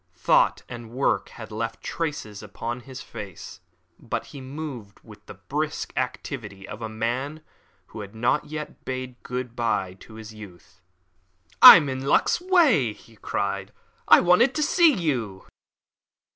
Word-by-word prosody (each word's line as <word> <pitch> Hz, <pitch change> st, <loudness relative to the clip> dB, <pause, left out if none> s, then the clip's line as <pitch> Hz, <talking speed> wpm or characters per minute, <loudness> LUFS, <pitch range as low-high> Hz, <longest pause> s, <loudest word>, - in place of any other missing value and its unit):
Thought -, -, +2 dB
and 120 Hz, -2 st, -9 dB
work 130 Hz, +4 st, 0 dB
had 110 Hz, -1 st, -11 dB
left 115 Hz, +1 st, -3 dB
their -, -, -36 dB
traces 145 Hz, -11 st, -4 dB
upon 120 Hz, +1 st, -6 dB
his 130 Hz, +1 st, -10 dB
face, 95 Hz, -5 st, -9 dB, 0.4 s
but -, -, -4 dB
he 140 Hz, -, -11 dB
moved 130 Hz, -7 st, -8 dB
with -, -, -15 dB
the -, -, -10 dB
brisk -, -, -4 dB
activity 95 Hz, -1 st, -5 dB
of 105 Hz, -, -9 dB
a 110 Hz, -, -4 dB
man 125 Hz, +8 st, -3 dB, 0.4 s
who -, -, -11 dB
had 100 Hz, +1 st, -9 dB
not 115 Hz, +2 st, +1 dB
yet 150 Hz, 0 st, -8 dB
bade 130 Hz, -1 st, -6 dB
good 125 Hz, -1 st, -5 dB
bye 105 Hz, -6 st, -1 dB
to 110 Hz, -, -14 dB
his 110 Hz, 0 st, -10 dB
youth. 90 Hz, -4 st, -14 dB, 0.8 s
"I'm 155 Hz, -4 st, +11 dB
in 130 Hz, 0 st, -4 dB
luck's 245 Hz, -, +2 dB
way," 310 Hz, -, +3 dB
he 115 Hz, +1 st, -19 dB
cried. 100 Hz, -2 st, -3 dB, 0.4 s
"I -, -, +8 dB
wanted 180 Hz, +9 st, +4 dB
to 305 Hz, -, +1 dB
see 335 Hz, +2 st, +5 dB
you." 125 Hz, -, -2 dB
120 Hz, 150 wpm, -24 LUFS, 110-145 Hz, 0.8 s, I'm